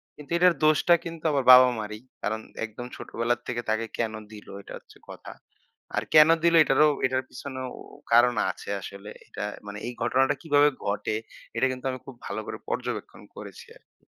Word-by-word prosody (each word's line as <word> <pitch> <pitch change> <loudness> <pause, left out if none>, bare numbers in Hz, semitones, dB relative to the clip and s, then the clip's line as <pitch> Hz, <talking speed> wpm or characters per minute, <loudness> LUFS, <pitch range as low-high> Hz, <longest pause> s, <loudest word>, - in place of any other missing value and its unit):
কিন্তু 150 +1 -14
এটার 180 0 +5
দোষটা 155 +3 +4
কিন্তু 165 -1 -7
আমার 140 -2 +1
বাবা-মা'রই। 115 -4 +5 0.2
কারণ 110 +1 -1 0.3
একদম 115 +3 -9
ছোটবেলার 120 +1 -2
থেকে 120 -1 -2
তাকে 110 +1 0
কেনো 110 -2 -2
দিলো? 105 -2 -11
এটা - - -11
হচ্ছে - - -19
কথা। - - -10 0.6
আর - - 0
কেন 155 +1 +8
দিল? 170 - +4
এটারও 150 +1 +4 0.2
এটার 130 0 0
পিছনেও 130 -1 -7 0.4
কারণ 120 +1 +6 0.2
আছে - - -12
আসলে। 100 +2 -9 0.2
এটা 105 - -5 0.2
মানে 100 - -7
এই 125 - -5
ঘটনাটা 135 +4 +2
কিভাবে 145 -2 +4 0.2
ঘটে? 105 +1 -1 0.4
এটা 115 - +2
কিন্তু 130 +1 -8
আমি 130 - -6
খুব 135 - -10
ভালো - - -4
করে - - -5
পর্যবেক্ষণ - - -4
করেছি - - -10
আরকি। - - -39
125 Hz, 170 wpm, -26 LUFS, 110-145 Hz, 0.6 s, কেন